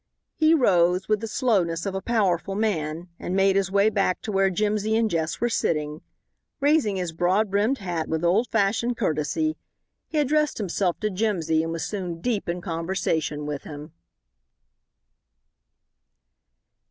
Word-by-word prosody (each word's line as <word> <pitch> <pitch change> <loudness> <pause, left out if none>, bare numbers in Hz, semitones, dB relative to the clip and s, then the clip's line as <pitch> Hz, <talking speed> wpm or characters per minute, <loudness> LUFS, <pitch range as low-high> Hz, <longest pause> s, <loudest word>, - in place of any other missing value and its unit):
He 315 +1 +4
rose, 180 - +3
with 215 -1 +2
the 225 - -5
slowness 190 -9 0
of 195 - -2
a 190 - -3
powerful 195 -5 0
man, 175 -5 -2
and 180 - -3
made 195 0 +3
his 195 -1 +1
way 200 +2 +3
back 195 -3 +1
to 215 - -3
where 195 -1 +3
Jimsy 210 +3 0
and 225 0 +3
Jess 160 -1 -1
were 240 - +1
sitting. 150 -8 -1 0.6
Raising 285 -8 +2
his 180 -3 -2
broad 190 +5 +1
brimmed 210 +7 +2
hat 175 -6 -3
with 160 +1 -1
old 205 +8 +3
fashioned 225 +3 +1
courtesy, 220 - -1 0.5
he 315 - -4
addressed 300 +1 +2
himself 190 -3 -1
to 215 -1 0
Jimsy 180 -6 0
and 165 0 -3
was 165 -1 -3
soon 180 -5 -4
deep 215 -1 -2
in 175 +1 -2
conversation 165 -3 -2
with 145 -1 -4
him. 150 0 -9
195 Hz, 155 wpm, -25 LUFS, 170-220 Hz, 0.6 s, He